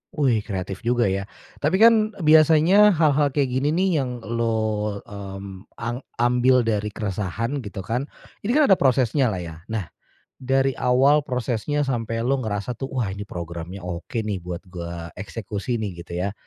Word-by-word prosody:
Wih 130 -7 +2
kreatif 95 -2 -5
juga 120 0 +3
ya. 100 +1 -2 0.3
Tapi 150 +6 +1
kan 220 -2 +5
biasanya 160 +6 +6
hal-hal 150 -2 +3
kayak 135 -2 0
gini 150 +3 +1
nih 185 -4 +2
yang 125 -3 -4
lo, 110 -2 -1
mmm, 100 -1 -9
ang 120 +2 -4 0.2
ambil 125 +1 +3
dari 105 -2 0
keresahan 105 +6 -2
gitu 100 -5 -7
kan, 125 +7 -2 0.3
ini 235 +7 -1
kan 300 -9 +5
ada 190 - +6
prosesnya 130 0 +3
lah, 95 -5 -2
ya? 80 -1 -8
Nah 110 -6 -4 0.5
dari 135 +1 +2
awal 135 +4 +4
prosesnya 125 +3 -1
sampai 115 -3 -2
lu 135 +1 +1
ngerasa 105 +1 -3
tuh, 135 +2 -5
"Wah 115 -7 -1
ini 105 +1 -7
programnya 85 +2 -7
oke, 90 +6 -4
nih, 100 -4 -2
buat 90 +1 -6
gua 85 -2 -7
eksekusi 105 +4 -4
nih." 105 -3 -3
Gitu 85 - -11
ya, 100 - -2
115 Hz, 165 wpm, -23 LUFS, 100-135 Hz, 0.5 s, biasanya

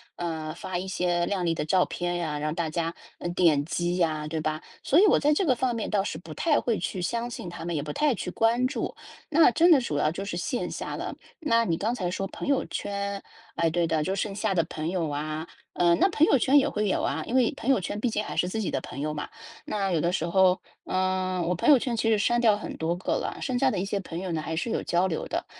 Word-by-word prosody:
呃， 160 -2 -4
发 180 +1 -4
一 185 +2 -4
些 175 -2 0
靓 185 -1 -1
丽 165 - +2
的 155 - -2
照 180 +3 +3
片 175 0 -3
呀， 155 -4 -2
让 155 +1 -2
大 165 -2 -1
家， 165 +1 -2 0.2
呃， - - -4
点 165 -5 +3
击 175 +2 -1
呀， 155 -3 0
对 160 +1 -3
吧？ 155 0 -2 0.2
所 300 - +4
以 - - +7
我 - - +5
在 295 +1 +3
这 380 - +1
个 265 - +4
方 245 0 0
面 225 - -3
倒 205 -2 +2
是 160 - -4
不 160 -1 -9
太 305 - +2
会 230 -3 0
去 180 +1 -3
相 235 +6 -2
信 195 -6 -6
她 170 -1 -8
们， 170 - -2
也 145 - -1
不 150 - -5
太 285 - +2
去 180 - -4
关 235 +3 +2
注。 280 - -3 0.3
那 315 -3 +6
真 335 +9 +4
的 295 -6 +7
主 150 -11 -2
要 150 +1 +2
就 190 +4 -5
是 195 -3 -4
线 245 +7 -2
下 - - -4
了。 - - -4 0.3
那 230 -8 +2
你 165 - +1
刚 220 +6 0
才 185 -7 -2
说 195 +2 -2
朋 - - -7
友 280 -2 +2
圈， 200 0 -3 0.3
哎， 165 -1 +2
对 170 +1 +1
的， 160 -1 +1
就 190 +4 -1
剩 200 +1 -2
下 210 0 -1
的 170 -3 +2
朋 155 0 -5
友 170 -4 -1
啊， 155 +2 -3 0.3
呃， 175 -1 +4
那 - - +4
朋 315 -3 +4
友 275 - +5
圈 270 +4 +4
也 275 - +4
会 210 0 -1
有 - - +1
啊， 155 +3 -1
因 245 - -2
为 250 -3 +3
朋 245 - -3
友 260 -8 +4
圈 205 - -4
毕 240 +2 +1
竟 210 -1 -1
还 - - -6
是 180 - +2
自 220 +4 -2
己 200 - -2
的 135 - 0
朋 135 - -7
友 150 +1 -1
嘛， 150 - -4 0.4
那 195 -2 -1
有 170 - +2
的 170 - +1
时 165 - 0
候， 185 +1 +3 0.2
呃， 185 -1 0
我 180 - +1
朋 175 - +1
友 290 - +9
圈 240 -1 -2
其 225 0 +1
实 220 - +4
删 240 +4 +2
掉 220 -4 +4
很 210 - -6
多 165 +2 0
个 180 - -2
了， - - -2
剩 255 -2 -1
下 270 - +4
的 - - -2
一 190 - -1
些 200 0 -2
朋 170 -3 -6
友 185 -1 -4
呢 160 -2 -1
还 160 +1 -4
是 180 - -2
有 - - 0
交 175 +2 +2
流 165 -4 -3
的。 - - -3
185 Hz, 300 characters per minute, -27 LUFS, 165-225 Hz, 0.4 s, 友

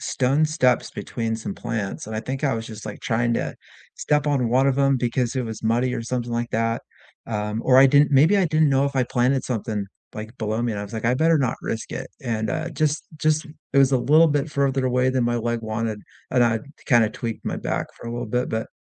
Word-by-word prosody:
stone 135 +4 +1
steps 130 -6 +1
between 115 -2 -3
some 110 -3 -5
plants, 110 -4 -4
and 110 - -6
I 110 - -1
think 135 +5 -4
I 135 - +2
was 115 0 -4
just, 110 -1 -9
like, 105 - -7
trying 120 0 0
to - - -3 0.4
step 150 0 +1
on 135 -5 +1
one 130 +3 +3
of 135 0 +1
'em 140 -1 +3
because 120 0 -1
it 130 - 0
was 110 -2 -6
muddy 120 +3 +1
or - - -3
something 120 0 -3
like 120 0 -2
that, 115 +1 0 0.4
um, 105 0 -2
or 130 - +5
I 135 - +9
didn't 145 +2 +4
maybe 150 +9 +5
I 195 - +3
didn't 155 -1 +3
know 135 0 +3
if 140 0 -2
I 130 - +4
planted 125 +2 +1
something, 110 -4 -2 0.3
like, 110 +3 -8
below 110 +1 -1
me 120 -1 0
and 100 - -4
I - - -4
was 105 - -11
like, 110 0 -5
"I 120 +2 +3
better 160 +3 +3
not 130 -4 0
risk 110 - -4
it," 130 - -5
and, 110 -3 -2
uh, 165 +1 -2
just 155 -1 0
just 155 0 +1 0.3
it 140 - +3
was 135 -1 +5
a 130 - +4
little 155 +6 +5
bit 145 0 0
further 135 -2 +1
away 125 +1 +2
than 130 -2 +1
my 120 0 +1
leg 120 0 -1
wanted, 110 -1 -3 0.3
and 125 -1 +4
I 115 -1 +1 0.3
kinda 120 -4 +4
tweaked 115 -1 -5
my - - -2
back - - -2
for - - -10
a 115 - -4
little 120 0 -4
bit, 125 +3 0
but 110 0 -3
125 Hz, 245 wpm, -23 LUFS, 115-135 Hz, 0.4 s, I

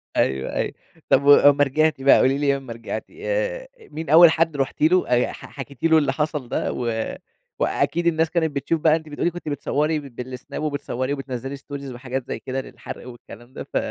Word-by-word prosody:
أيوه، 65 0 0
أيوه. - - -1 0.4
طب 140 - +4
وأمّا 145 0 +7
رجعتِ 155 +1 +1
بقى، 135 +1 +7
قولي 135 +1 +3
لي 140 -1 +2
لمّا 135 -4 -5
رجعتِ، 115 -1 -6
آآ - - -3
مين 165 - -8
أول 165 +2 +9
حد 160 -2 +1
رُحتِ 135 -1 -2
له 180 +4 +3
أي 125 0 +3
ح - - -11
حكيتِ 135 -2 -10
له 160 -1 +5
اللي 145 -3 +2
حصل 150 -4 -2
ده - - -1
و 115 -2 -2 0.4
وأكيد 170 +1 0
الناس 160 -1 +2
كانت 160 -3 0
بتشوف 155 +3 -1
بقى 155 -1 +5
أنتِ 160 -1 -6
بتقولي 160 +4 -1
كنتِ 175 -3 -7
بتصوّري 150 +2 0
بالسناب 130 +1 -7
وبتصوّري 140 -2 -2
وبتنزّلي 135 0 -5
stories 140 -1 -8
وحاجات 125 +1 -5
زي - - -4
كده 130 +4 -4
للحَرْق 130 - -10
والكلام 120 0 -13
ده - - -6
ف - - +2
145 Hz, 190 wpm, -23 LUFS, 130-160 Hz, 0.4 s, أول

